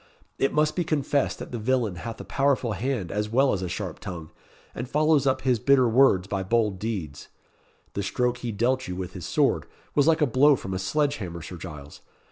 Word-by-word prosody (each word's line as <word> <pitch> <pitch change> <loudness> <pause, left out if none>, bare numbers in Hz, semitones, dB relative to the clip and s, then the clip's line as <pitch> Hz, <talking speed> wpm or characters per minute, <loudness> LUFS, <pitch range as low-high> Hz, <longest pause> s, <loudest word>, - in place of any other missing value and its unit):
It 135 - +2
must 150 0 +1
be 180 - +1
confessed 145 -3 0
that - - -8
the 120 - -4
villain 115 -5 0
hath 115 +5 -6
a - - -6
powerful 135 -4 +1
hand 105 -3 -2
as 105 +1 -2
well 130 +4 +3
as 95 - -2
a 90 - -3
sharp 90 -2 -5
tongue, 85 -6 -7 0.4
and 120 +2 -6
follows 150 -1 +3
up 130 0 +1
his 125 -3 +2
bitter 135 +1 +4
words 115 -6 +4
by 100 -1 -2
bold 105 -1 +1
deeds. 90 -10 -4 0.7
The 100 - -2
stroke 125 +5 0
he 120 - -3
dealt 130 +5 0
you 90 - -4
with 90 -1 -5
his - - -7
sword - - +1 0.3
was 145 0 +3
like 165 -1 +3
a - - +6
blow 140 +3 +5
from 95 -6 -6
a 95 - -2
sledge 145 +8 0
hammer, 85 -5 -6
Sir 90 +1 -8
Giles. 75 -5 -10
115 Hz, 215 wpm, -26 LUFS, 95-135 Hz, 0.7 s, a